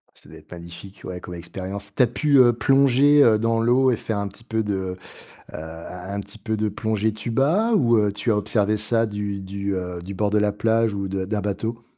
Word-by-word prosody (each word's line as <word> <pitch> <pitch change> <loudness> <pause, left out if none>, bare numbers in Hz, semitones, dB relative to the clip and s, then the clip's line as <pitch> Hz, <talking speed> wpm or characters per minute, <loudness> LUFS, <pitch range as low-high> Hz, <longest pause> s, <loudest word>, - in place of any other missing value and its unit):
Ça - - -17
doit - - -12
être - - -21
magnifique, 85 +3 -11
ouais, 90 -1 -6
comme 90 - -8
expérience. 95 +4 -7
Tu - - +3
as 125 - +6
pu, 140 +4 +1
heu, 120 -2 +7
plonger, 140 +3 +4
heu, 110 -5 +5
dans 115 +1 +1
l'eau 125 +3 +3
et 120 - +1
faire 110 -1 -3
un 100 - -2
petit 115 - -17
peu 110 -1 -1
de, 105 -1 -2
heu, 95 -1 -4 0.6
un 85 +4 -8
un - - -2
petit 100 0 -14
peu 110 0 -2
de 105 0 0
plongée 110 +1 -1
tuba 135 - +1
ou 120 - +4
heu, 105 -1 +2
tu 110 +3 -1
as 105 - +2
observé 105 0 0
ça 115 +2 +2
du 105 -1 -4
du, 100 +1 -4
heu, 90 -1 -5
du 95 +3 -7
bord 105 +2 0
de 105 - +2
la 105 0 +2
plage 115 +1 +1
ou 100 -1 -3
de 95 0 -3
d'un 105 +1 -2
bateau? 110 +3 -4
105 Hz, 235 wpm, -23 LUFS, 100-115 Hz, 0.6 s, heu